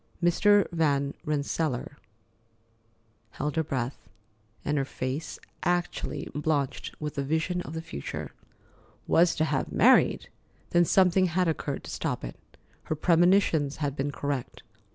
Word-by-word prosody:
Mrs. 200 +4 +4
Van 145 -4 +1
Rensselaer 150 -2 -2 1.4
held 150 - -2
her 160 - +2
breath, 130 -3 -4 0.6
and 150 0 +1
her - - +1
face 135 +3 -4 0.2
actually 175 0 -1
blanched 145 -2 -2
with 150 -1 -4
the 140 - -2
vision 160 +5 0
of 160 - -7
the 160 - -4
future. 70 - -6 0.7
"Was 170 0 +4
to 155 - +1
have 140 -3 -1
married!" - - +4 0.4
Then 175 0 +5
something 185 +1 +4
had 180 +1 +1
occurred 150 -3 -2
to - - -8
stop - - -3
it. - - -6 0.5
Her 155 - -1
premonitions 165 -3 +3
had 145 -3 -2
been 140 0 -1
correct. 140 -3 -4
155 Hz, 130 wpm, -28 LUFS, 140-175 Hz, 1.4 s, Then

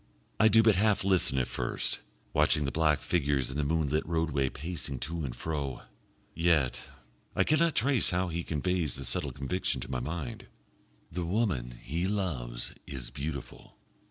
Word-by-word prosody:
I 110 - +7
do 110 +1 +6
but 110 -4 +5
half 105 0 +3
listen 95 -8 +4
at 65 - +1
first - - -1 0.3
watching 75 0 +3
the 70 - -1
black 75 -2 +2
figures 70 -6 +1
in 70 - -5
the 75 - +1
moonlit 75 0 +1
roadway 80 -5 +1
pacing 75 -2 -4
to 80 +5 -3
and 65 -4 -4
fro. 70 -5 -3 0.5
Yet 80 -6 +2 0.5
I - - +4
cannot 155 +1 +3
trace 130 -1 +3
how 90 +1 0
he 85 +1 -2
conveys 85 0 -1
the 70 - -4
subtle - - 0
conviction 80 +8 -1
to - - -6
my 65 - -1
mind 75 0 -5 0.6
the 90 +2 -2
woman 85 - -1
he 85 +7 -1
loves 70 -13 -1
is 65 -4 -4
beautiful. 70 -1 -6
80 Hz, 160 wpm, -30 LUFS, 70-90 Hz, 0.6 s, I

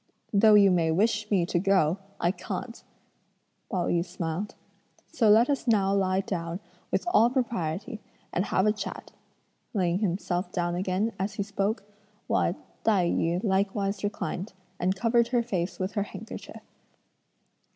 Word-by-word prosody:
"Though 210 +1 +6
you 200 -2 +7
may 170 -3 +2
wish 210 +5 +1
me 190 -5 +3
to 175 0 0
go, 190 -2 +2 0.2
I 175 - +2
can't," 230 +4 -6 0.9
Pao 180 -4 0
yü 170 -1 +1
smiled, 175 +2 -4 0.6
"so 230 -9 +3
let 225 +4 +6
us 280 -3 -1
now 200 -4 +3
lie 190 -1 +2
down 170 -2 -4 0.3
with - - 0
all 230 +2 +6
propriety 225 - -2 0.3
and 180 - +1
have 190 - +1
a 210 - +5
chat," 210 - -6 0.6
laying 180 -2 +1
himself 180 -2 -1
down 175 -1 -1
again, 185 +5 0
as 195 +2 -2
he 200 - -1
spoke, 200 +2 -1 0.4
while - - +1 0.3
Tai 190 -6 +3
yü 170 +3 0
likewise 195 0 0
reclined, 205 -1 -3 0.3
and 185 +2 +1
covered 235 +3 +2
her 240 -1 +1
face 185 -6 -2
with 185 +1 -2
her 205 - -1
handkerchief. 220 +3 -8
195 Hz, 150 wpm, -27 LUFS, 180-215 Hz, 0.9 s, you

